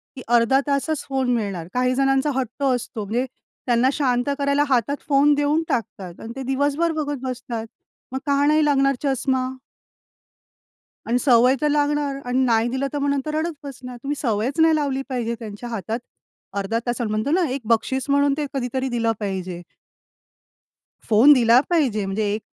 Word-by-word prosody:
कि 260 - -8
अर्धा 240 +3 +4
तासच 285 +2 0
फोन 265 -2 0
मिळणार. 195 -7 -3
काही 250 0 +1
जणांचा 270 +2 +2
हट्ट 260 +1 -3
असतो, 245 -4 -1
म्हणजे 235 +6 -1 0.4
त्यांना 245 +1 +3
शांत 250 -3 0
करायला 280 +1 +2
हातात 260 +2 +1
फोन 285 +1 +4
देऊन 290 +3 +1
टाकतात 195 -6 -4
आणि 225 - -7
ते 270 - -5
दिवसभर 285 +5 0
बघत 290 -3 -2
बसतात. 245 -3 -4 0.5
मग 265 - -3
का 280 0 +3
नाही 305 +1 +4
लागणार 275 -2 +3
चष्मा? 265 -1 0 1.6
आणि 240 +2 +2
सवय 250 0 +5
तर 300 - +2
लागणार 290 -1 0
अन् 255 +1 +2
नाही 230 -1 +2
दिलं, 265 +3 -1
तर 290 - -2
मग 280 0 0
तर 305 - -3
रडत 325 +2 -1
बसणार. 250 -2 -8
तुम्ही 285 +1 -2
सवयच 240 +5 0
नाही 320 -1 +5
लावली 275 -3 -1
पाहिजे, 235 -3 -2
त्यांच्या 220 +1 -8
हातात, 225 0 -3 0.6
अर्धा 200 +3 -1
तासाला 240 -2 -1
म्हणतो 215 +6 -1
ना, 350 +2 +2
एक 270 +2 -2
बक्षीस 265 +4 -3
म्हणून 285 0 +3
ते 300 -1 -2
कधीतरी 260 0 -2
दिलं 230 -2 0
पाहिजे. 185 -3 -4 1.5
फोन 235 +6 +7
दिला 240 -2 +5
पाहिजे, 255 - +1
म्हणजे 205 +1 -1
एक 215 - -5
260 Hz, 165 wpm, -22 LUFS, 230-285 Hz, 1.6 s, फोन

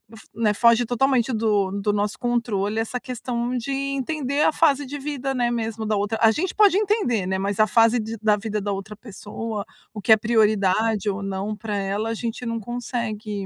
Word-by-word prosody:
f 220 - -14
né, 220 -2 +1
foge 235 +2 +4
totalmente 250 +1 +1
do 210 -3 +1
do 210 +1 +1
nosso 205 0 -1
controle 225 -4 -1
essa 225 +2 -2
questão 245 0 -3
de 245 +3 -4
entender 275 +1 -2
a - - +3
fase 290 -3 +3
de 285 +2 -6
vida, 275 -2 -3
né, 240 -1 +1
mesmo 225 -2 -3
da 215 -1 0
outra 205 +2 -1
a 225 - +6
gente 335 +9 -2
pode 405 -3 +5
entender, 400 - +1
né, 190 0 0
mas 200 +1 -2
a 215 - +5
fase 230 +2 +4
de 225 +1 -4
da 215 -1 +3
vida 210 0 -3
da 205 0 -2
outra 195 +2 -5
pessoa, 215 0 -6 0.3
o 210 - -7
que 220 - +6
é - - +5
prioridade 215 -1 +2
ou 200 +1 -3
não 195 +2 -3
pra 215 -2 -4
ela, 200 +2 -2
a - - -1
gente 230 +2 -4
não 230 -1 -2
consegue, 220 -3 -4
225 Hz, 205 wpm, -23 LUFS, 210-245 Hz, 0.3 s, a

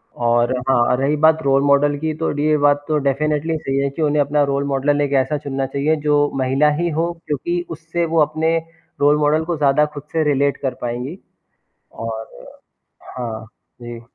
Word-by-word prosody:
और 120 +1 +1 0.2
हाँ, 125 -1 +3
रही 140 +3 +1
बात 160 0 +4
रोल 135 0 +3
मॉडल 145 +1 +3
की, 160 +1 -2
तो 160 +1 -2
डी 145 +1 -2
ये 155 0 +3
बात 145 0 +2
तो 155 - +1
डेफ़िनेटली 150 +3 0
सही 135 -3 -3
है 140 0 0
कि 150 +4 -6
उन्हें 150 -1 +2
अपना 145 +1 +1
रोल 140 0 0
मॉडल 140 +1 +1
ना, 145 - +1
एक 140 - -2
ऐसा 140 +3 -2
चुनना 135 -2 -3
चाहिए 140 +4 0
जो 145 0 +3
महिला 135 +3 +2
ही 175 - 0
हो, 165 +2 -1
क्योंकि 170 +5 -2
उससे 165 +1 -3
वो 165 -1 +2
अपने 160 +2 +1 0.4
रोल 145 +1 +4
मॉडल 150 +2 +2
को 170 -1 -2
ज़्यादा 145 0 +3
खुद 145 -1 -8
से 160 -1 +1
रिलेट 140 -1 +1
कर 135 -2 -3
पाएँगी। 125 +8 -4 0.8
और 110 -1 -6 0.9
हाँ। 115 -3 -5 0.4
जी। 120 -1 -8
145 Hz, 190 wpm, -19 LUFS, 135-155 Hz, 0.9 s, बात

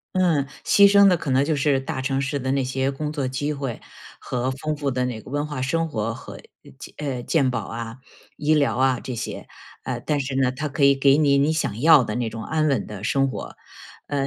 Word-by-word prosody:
嗯， 170 -7 +2 0.2
牺 200 0 +6
牲 200 -1 +7
的 180 - +5
可 155 -5 -4
能 135 +2 +3
就 155 - 0
是 140 -1 +2
大 135 0 -4
城 135 0 -1
市 140 +1 -1
的 130 0 -2
那 135 0 +1
些 130 +1 -1
工 150 +2 -4
作 145 -3 -2
机 145 +3 -2
会 135 -5 -5 0.4
和 125 +1 -2
丰 150 +4 -3
富 145 -2 -2
的 125 0 -1
那 120 -3 -4
个 - - -13
文 145 +1 -1
化 145 -4 -5
生 165 +6 0
活 115 -4 -2
和， - - -10
呃， - - -17
健 - - -11
呃， 135 -5 -4
健 140 -6 +2
保 115 -2 -1
啊、 115 +1 -6 0.4
医 150 +1 +1
疗 145 -2 +2
啊 130 -1 +2
这 130 - -6
些。 115 - -6 0.4
呃， - - -4
但 150 -2 0
是 135 0 -3
呢， 130 -2 +2
它 150 +4 -4
可 140 0 -2
以 140 0 +6
给 135 0 +4
你 140 -2 +3
你 145 +3 +2
想 150 -9 -2
要 150 -1 +7
的 105 -2 -4
那 120 -2 -1
种 110 0 -7
安 155 -1 0
稳 135 -7 0
的 105 -2 -9
生 135 +3 +1
活， - - -7 0.5
呃 140 -1 -1
135 Hz, 255 characters per minute, -23 LUFS, 130-150 Hz, 0.5 s, 牲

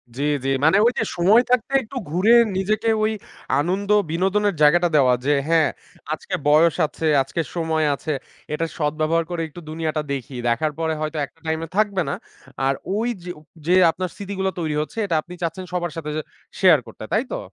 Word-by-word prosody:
জ্বি, 140 - -3 0.2
জ্বি। 135 - -1 0.2
মানে 160 +5 +5
ঐযে 245 - +2
সময় 200 +7 +5
থাকতে 250 0 +2
একটু 245 +5 -8
ঘুরে 185 +9 +3 0.2
নিজেকে 215 +4 0
ওই 215 - +2 0.5
আনন্দ, 190 +6 -1 0.2
বিনোদনের 195 +4 +1
জায়গাটা 175 +4 +5
দেওয়া 130 -4 +5
যে, 145 - +3
"হ্যাঁ, 165 -2 +4 0.4
আজকে 155 - -4
বয়স 155 +2 +5
আছে, 160 - -3 0.2
আজকে 150 +5 -3
সময় 160 -2 0
আছে, 155 +2 -3 0.4
এটার 165 +2 -1
সদব্যবহার 155 +2 0
করে 175 -1 -3
একটু 175 +3 -11
দুনিয়াটা 155 -1 -2
দেখি, 130 -1 -6
দেখার 120 +7 +1
পরে 160 -1 0
হয়তো 155 0 -3
একটা 165 - -25
টাইমে 160 +1 -2
থাকবে 205 -3 +2
না।" - - -1 0.5
আর 135 - +3 0.2
ওইযো 210 -6 -3 0.4
যে 180 - +4 0.2
আপনার 185 +2 -4
স্মৃতিগুলো 195 -1 -3
তৈরি 155 -3 -2
হচ্ছে 155 - -7
এটা 170 - -1
আপনি 175 +3 -12
চাচ্ছেন 185 +3 -3
সবার 175 -2 -1
সাথে 155 -2 -4
যে 155 - -1 0.4
শেয়ার 180 -7 +6
করতে। - - -10
তাই 220 - +3
তো? - - -2
165 Hz, 180 wpm, -22 LUFS, 155-195 Hz, 0.5 s, শেয়ার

